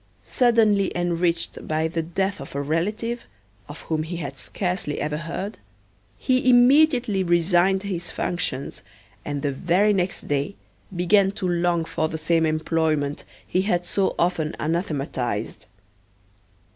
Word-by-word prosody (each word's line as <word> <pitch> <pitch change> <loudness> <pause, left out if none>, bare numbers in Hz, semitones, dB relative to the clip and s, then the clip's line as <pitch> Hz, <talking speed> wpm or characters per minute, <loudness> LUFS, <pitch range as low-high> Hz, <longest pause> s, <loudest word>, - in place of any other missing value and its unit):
Suddenly 220 -6 +3
enriched 170 -1 -1
by 155 +1 0
the 165 0 -2
death 190 +4 -2
of - - -9
a 140 - -1
relative, 210 +10 -2 0.4
of 145 - -9
whom 160 -1 -2
he 160 +3 -5
had 140 -5 -5
scarcely 180 -1 -3
ever 150 0 -2
heard, 180 +6 -5 0.6
he 255 -1 +2
immediately 250 -4 +5
resigned 175 +2 +3
his 180 -4 -4
functions, 140 -6 -3 0.4
and 145 -1 -4
the 145 - +1
very 180 +8 +2
next 185 -1 -2
day 145 +7 -1 0.4
began 195 +3 +3
to 190 -2 -3
long 175 -1 +1
for 160 -1 -1
the 160 - -4
same 160 +1 +2
employment 155 -2 0 0.2
he 185 - 0
had 175 -3 0
so 195 +2 0
often 170 -3 0
anathematized. 135 - -2
175 Hz, 135 wpm, -24 LUFS, 155-195 Hz, 0.6 s, immediately